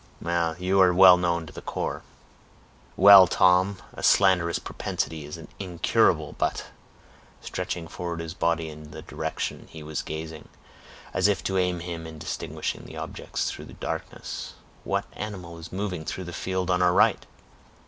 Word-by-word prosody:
"You 95 +2 +2
are 90 -1 +5
well 95 0 +9
known 85 -2 0
to 70 - -12
the - - -8
corps." - - -4 0.9
"Well, 95 -1 +9
Tom, 90 +3 +3 0.2
a - - -9
slanderous 90 -4 +4
propensity 80 -2 -4
is 75 +3 -8 0.2
incurable—but," 90 -3 +1 0.7
stretching 85 -2 -4
forward 85 0 -5
his 80 -1 -5
body 85 -1 0
in 75 0 -11
the 80 +1 -9
direction - - -4
he 80 -2 -10
was 75 -1 -4
gazing, 80 0 -7 0.6
as 90 - +3
if 100 -2 0
to 95 - -1
aid 90 -2 0
him 85 -2 -6
in 80 -1 -10
distinguishing - - -5
objects - - -4
through - - -9
the - - -12
darkness, - - -6 0.3
"what - - -1
animal 90 -5 -7
is 85 0 -10
moving 95 -4 -3
through 95 - -5
the 85 0 -8
field 95 0 -2
on 90 0 +2
our 90 0 +4
right?" - - +4
90 Hz, 150 wpm, -26 LUFS, 80-95 Hz, 0.9 s, well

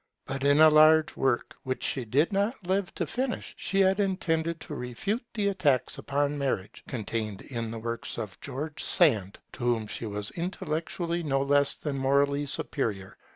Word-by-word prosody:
But 135 0 -4
in 145 +1 +4
a 155 0 +8
large 155 +1 +6
work 130 -3 0
which 130 -1 -4
she 130 -3 0
did 145 - +2
not 200 +1 -1
live 190 +1 0
to - - -1
finish, 255 0 -3
she 195 0 0
had 190 +1 +3
intended 170 -5 0
to - - -7
refute 145 - -3
the 205 -2 +1
attacks 150 -10 +1
upon 145 +1 -1
marriage, 125 -8 -3
contained 110 -4 -4
in 115 -3 -4
the 115 - -5
works 115 +1 -5
of 105 -4 -6
George 145 +3 -4
Sand, 110 - +4 0.2
to 125 - -7
whom 120 -3 +1
she 110 +2 -5
was 105 0 -2
intellectually 170 0 -3
no 135 -4 0
less 140 0 +3
than 140 -3 -4
morally 140 +2 +2
superior. 105 -8 -2
145 Hz, 170 wpm, -28 LUFS, 120-170 Hz, 0.2 s, a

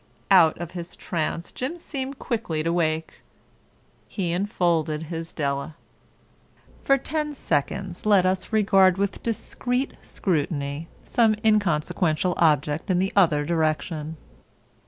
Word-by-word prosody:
Out 170 -5 +6
of 175 0 -6
his 175 -1 -7
trance 170 0 -3
Jim 265 +7 -4
seemed 275 -4 -5
quickly 195 - -2
to 165 +1 0
wake. 160 -2 -1 0.9
He 180 -5 -2
enfolded 170 -5 0
his 165 0 -5
Della. 140 +1 -2 1.1
For 275 - +4
ten 300 +2 -3
seconds 175 - -2
let 200 -3 +4
us 185 +2 -1
regard 195 -4 +4
with 200 0 -1
discreet 250 +3 -2
scrutiny 150 -3 -2 0.2
some 225 -2 +3
inconsequential 180 -4 +2
object 150 0 +2
in 185 - +3
the 190 +2 0
other 160 -7 +4
direction. 155 -1 -1
175 Hz, 115 wpm, -25 LUFS, 155-205 Hz, 1.1 s, Out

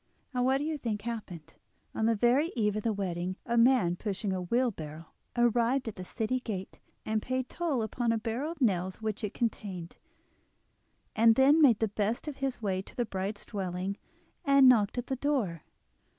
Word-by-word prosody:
And 250 -1 +1
what 265 +1 +3
do 280 - -3
you 310 -1 -2
think 215 -5 -3
happened? 185 -9 -6 0.4
On 220 - +1
the 230 - +3
very 250 +9 +3
eve 210 -3 +1
of 215 - -1
the 225 - 0
wedding 185 -3 -2
a 235 - -1
man 230 -7 +4
pushing 195 0 -3
a 185 - -2
wheelbarrow 175 -7 -2 0.3
arrived 240 +2 +2
at 225 - -4
the 185 - -7
city 230 +6 -2
gate, 200 -6 -6 0.3
and 215 0 0
paid 255 +1 -2
toll 310 -9 -1
upon 235 +1 -1
a 230 - +1
barrel 230 +8 -3
of 335 - -10
nails 185 -5 +1
which 220 0 -3
it 210 - -3
contained, 190 -7 -3 1.2
and 225 0 +6
then 280 +5 +5
made 250 -8 +6
the 220 - +1
best 210 +6 -2
of 295 - -5
his 265 -4 -3
way 190 -2 0
to - - -15
the 240 - 0
bride's 195 0 -4
dwelling 190 -1 -3 0.5
and 275 -1 +6
knocked 225 -3 +4
at 245 - -2
the 265 - -2
door. 245 - -1
225 Hz, 190 wpm, -30 LUFS, 195-255 Hz, 1.2 s, and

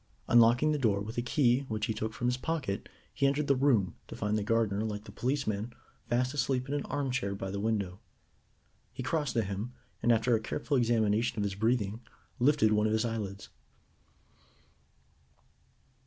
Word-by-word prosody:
Unlocking 120 +5 +5
the 150 - 0
door 105 -6 +2
with 105 +3 -6
a - - +1
key 125 0 +3
which 110 -2 -2
he 110 - -1
took 110 +1 -3
from 120 - -5
his 125 0 +2
pocket, 130 -7 -3 0.2
he 140 - +2
entered 140 +2 +1
the 140 - +3
room, 125 -8 +2
to - - -8
find 105 0 -1
the 105 - +1
gardener, 110 -1 +1
like 105 -1 -4
the - - -11
policeman, 120 -4 -2 0.4
fast 125 +2 +1
asleep 135 -3 0
in 140 - -3
an 145 - -1
armchair 130 -8 -2
by 95 -1 -5
the 100 - -3
window. 100 -3 -1 0.9
He 130 - -6
crossed 145 +1 -1
to 115 - +2
him, 100 +5 -4 0.3
and, 120 - +3
after 115 +2 +3
a 115 - +3
careful 140 +6 -2
examination 115 -2 +2
of 105 - 0
his 100 -1 -1
breathing, 110 +1 0 0.4
lifted 130 -4 +4
one 105 0 +3
of 110 - 0
his 110 +2 +1
eyelids. 105 -3 -4
115 Hz, 180 wpm, -30 LUFS, 105-130 Hz, 0.9 s, Unlocking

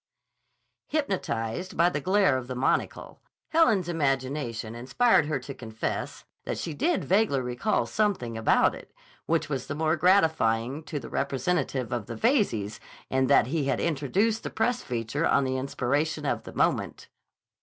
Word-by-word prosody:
Hypnotized 185 - -2
by 170 +2 +5
the 150 -4 -3
glare 190 -3 +3
of 130 -1 -3
the 130 - -5
monocle, 125 - -1 0.3
Helen's 225 - +3
imagination 135 -7 -1
inspired 150 - +2
her 150 - 0
to 140 - -7
confess 110 -3 -5 0.2
that - - -3
she 165 - -4
did 335 - 0
vaguely 195 -7 +2
recall 125 - 0
something 195 - -1
about 115 0 +3
it, - - -12 0.4
which 160 -1 +1
was 135 -4 -3
the 140 - -4
more 155 +1 +1
gratifying 155 - +2
to 150 - -4
the - - -9
representative 140 -2 -1
of 120 -4 -3
the 115 - -5
Veyzes 115 - +1 0.3
in 130 0 +2
that 140 -5 +5
he 145 +3 -1
had 140 - 0
introduced 180 - 0
the - - -5
press 245 +2 0
feature 120 +6 -2
on - - +3
the 130 0 -1
inspiration 145 +4 -1
of - - -1
the - - -9
moment. - - 0
145 Hz, 155 wpm, -27 LUFS, 125-180 Hz, 0.4 s, by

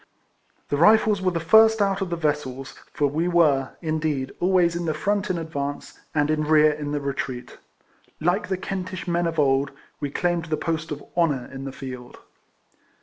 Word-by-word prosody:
The 145 - 0
Rifles 210 +3 +5
were 185 - +2
the 170 -2 -2
first 220 +6 +5
out 195 -1 +1
of 190 - -2
the 170 - -1
vessels, 145 -5 -2 0.2
for 145 - 0
we 155 +5 0
were, 150 -7 +3
indeed, 155 -4 -1
always 180 -2 +3
in 170 0 -2
the 155 -2 -1
front 205 +5 -1
in 185 - 0
advance, 145 -3 -5 0.2
and 145 0 +2
in 155 0 0
rear 155 0 +5
in 145 -1 -5
the 145 - -1
retreat. 135 -3 -5 0.6
Like 175 +5 +1
the 190 0 -1
Kentish 185 0 -5
men 175 0 +1
of 165 -1 -4
old, 135 -1 +2 0.3
w^e 145 - -2
claimed 175 +1 0
the 155 -2 -2
post 160 +1 -2
of 145 -1 -5
honour 150 -8 +1
in 135 0 -7
the 135 - -4
field. 130 -2 -9
155 Hz, 185 wpm, -24 LUFS, 145-175 Hz, 0.6 s, Rifles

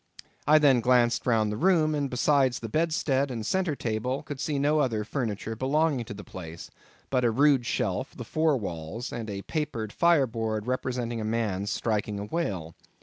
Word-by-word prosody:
I 155 +1 +7
then 140 -5 +5
glanced 120 0 +3
round 110 -3 +2
the 105 - -3
room; 160 0 +3
and 145 -2 -1
besides 130 0 +2
the 115 - -6
bedstead 140 -1 +1
and 115 -4 -4
centre 180 - 0
table, 120 +3 -2
could 145 -3 -7
see 145 0 -1
no 145 +2 +2
other 115 -7 +1
furniture 110 -2 -3
belonging 140 +1 +1
to 105 - -7
the 105 - -9
place, 85 -3 -9 0.4
but 130 -2 +2
a 120 - +4
rude 135 +1 +3
shelf, - - -2
the - - -6
four 155 -2 +2
walls, 90 +2 -5
and 115 -2 -5
a 100 -1 -5
papered 140 -9 -3
fireboard 115 -10 +2
representing 125 -2 -2
a - - -3
man 110 -3 -1
striking 105 -1 -1
a 100 - -4
whale. 100 - -3
120 Hz, 180 wpm, -27 LUFS, 110-145 Hz, 0.4 s, I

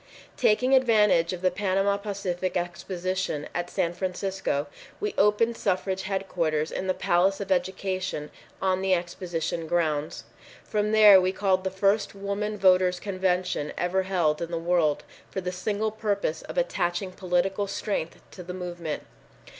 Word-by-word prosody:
Taking 250 +5 +3
advantage 210 -9 +4
of 180 0 -6
the 185 - +3
Panama 195 +1 +1
Pacific 195 -3 -3
Exposition 175 -2 -3
in 175 0 -2
San 175 -2 -1
Francisco, 185 -4 -2 0.3
we 420 0 -2
opened 210 +3 +3
suffrage 190 0 -1
headquarters 175 -5 -1
in 190 - -3
the 185 - +1
Palace 185 +3 +2
of 200 -1 -5
Education 185 -3 -1 0.3
on 190 -1 +1
the 190 -1 +3
exposition 170 -2 -3
grounds. 155 -3 -1 0.4
From 210 0 -1
there 210 -3 +8
we 185 0 +1
called 190 -1 +1
the 190 - 0
first 200 +2 +1
Woman 200 +2 -3
Voters' 185 -1 +4
Convention 185 -5 -1
ever 180 +2 +1
held 175 -5 0
in 170 - -3
the 170 - -2
world 165 -3 +1 0.3
for - - -4
the 180 -1 -3
single 205 +4 -1
purpose 205 -7 -1
of - - -9
attaching 185 - 0
political 185 +2 0
strength 195 -4 -3
to 185 - -10
the 180 +1 -7
movement. 175 -4 -5
185 Hz, 145 wpm, -26 LUFS, 175-200 Hz, 0.4 s, there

